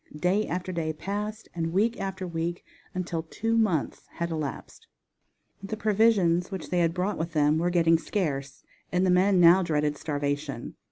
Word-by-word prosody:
Day 190 +6 +1
after 180 +1 -3
day 160 -3 -2
passed, 210 +6 -4
and 165 -1 -2
week 225 +5 +1
after 190 -1 -4
week 170 0 -3 0.3
until 175 -3 -2
two 225 +8 -2
months 205 -10 0
had 170 0 -3
elapsed. 155 -4 -5 0.7
The 200 +2 -5
provisions 205 -5 +3
which 190 -5 -6
they 180 - +2
had 165 0 +1
brought 185 +3 -1
with 165 0 -3
them 150 +1 +3
were 175 +1 +1
getting 165 -2 +4
scarce, 140 -8 -3 0.3
and 180 +1 +2
the 185 - +3
men 185 +1 +4
now 175 +2 +7
dreaded 150 -3 0
starvation. 145 -3 -3
175 Hz, 165 wpm, -27 LUFS, 160-195 Hz, 0.7 s, now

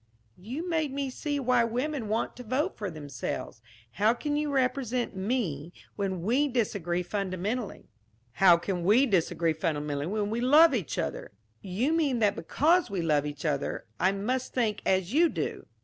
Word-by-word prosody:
"You 260 - -5
made 320 -4 0
me 275 -1 -3
see 290 +2 -3
why 250 -2 +3
women 250 +2 -2
want 220 +2 -1
to 250 - -8
vote 270 - -1
for 205 -3 -4
themselves. 145 -7 -6 0.3
How 215 - +2
can 290 +4 -2
you 295 0 -1
represent 255 -3 0
me, 190 - -2 0.2
when 190 -4 -2
we 255 +9 +2
disagree 200 - -1
fundamentally?" 195 +4 -3 0.4
"How 175 +4 +6
can 175 0 -3
we 220 +9 +5
disagree 170 -6 +1
fundamentally 150 -2 -2
when 205 +1 -1
we 230 +2 -1
love 295 +5 +6
each 210 -10 -2
other?" - - -4 0.3
"You 215 - -1
mean 295 -6 +1
that 210 -3 +2
because 315 - +2
we 190 -4 -2
love 150 -2 +2
each 145 0 -7
other, 145 -2 -2
I 185 - +3
must 245 +6 -2
think 225 -4 0
as 190 +2 +1
you 335 +3 +5
do?" - - -4
215 Hz, 165 wpm, -28 LUFS, 180-260 Hz, 0.4 s, How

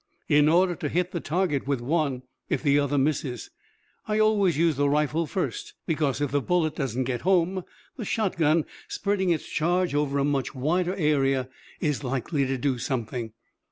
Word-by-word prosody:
"In 150 -1 +5
order 175 +2 +4
to 150 - -3
hit 180 +3 0
the 170 - -2
target 155 -4 -1
with 140 -3 0
one, 135 -1 -1 0.3
if - - -1
the 145 -1 +4
other 145 0 0
misses. 135 -3 -1 0.6
I 215 0 0
always 210 -6 +3
use 165 -1 +3
the 145 +1 +2
rifle 150 +2 +1
first, 415 - -3
because 150 -4 0
if 145 - 0
the 145 0 +1
bullet 160 -1 +1
doesn't 130 -2 -1
get 125 -1 -2
home 185 0 +2 0.3
the 240 - -4
shotgun, 170 -8 +1 0.2
spreading 200 -2 -1
its 165 -2 0
charge 175 +1 0
over 145 -1 0
a 140 - +2
much 140 -2 -1
wider 175 +8 0
area, 135 -6 +1 0.3
is 150 -2 -1
likely 135 +2 -1
to 135 0 -1
do 130 -1 -1
something." 120 -2 -3
150 Hz, 175 wpm, -26 LUFS, 135-175 Hz, 0.6 s, In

